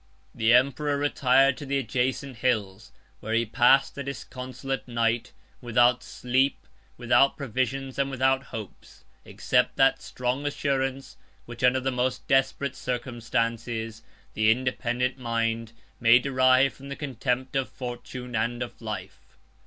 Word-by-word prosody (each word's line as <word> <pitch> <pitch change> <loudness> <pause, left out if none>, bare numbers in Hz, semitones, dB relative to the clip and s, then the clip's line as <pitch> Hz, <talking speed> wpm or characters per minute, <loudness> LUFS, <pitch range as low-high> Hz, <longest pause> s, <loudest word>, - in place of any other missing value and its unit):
The 110 0 +2
emperor 140 +4 +3
retired 135 -2 +3
to 145 - -7
the 140 +1 0
adjacent 130 +1 -2
hills; 110 -4 -1 0.3
where 110 +1 -3
he 115 0 +2
passed 125 +5 +4
a - - -1
disconsolate 135 0 -6
night, 115 0 0 0.3
without 120 +1 +3
sleep, 130 +3 -1 0.3
without 135 - +3
provisions, 135 +1 -3
and 140 0 +1
without 135 0 +1
hopes; 110 -4 -10 0.2
119 - - -12
except - - +1
that - - +3
strong 125 +3 -3
assurance, 135 -2 -2 0.3
which, 120 0 -9
under 125 +1 +4
the 135 +1 -1
most 125 0 -2
desperate 135 0 +1
circumstances, 115 -2 -3 0.3
the 110 0 +2
independent 125 +1 0
mind 115 -1 -1 0.3
may 115 +1 +7
derive 130 +1 +3
from 140 +1 -12
the 140 - -4
contempt 130 -1 -3
of 135 -1 0
fortune 125 0 -7
and 120 +2 -1
of 120 - -10
life. 110 -2 -8
125 Hz, 135 wpm, -26 LUFS, 115-135 Hz, 0.3 s, may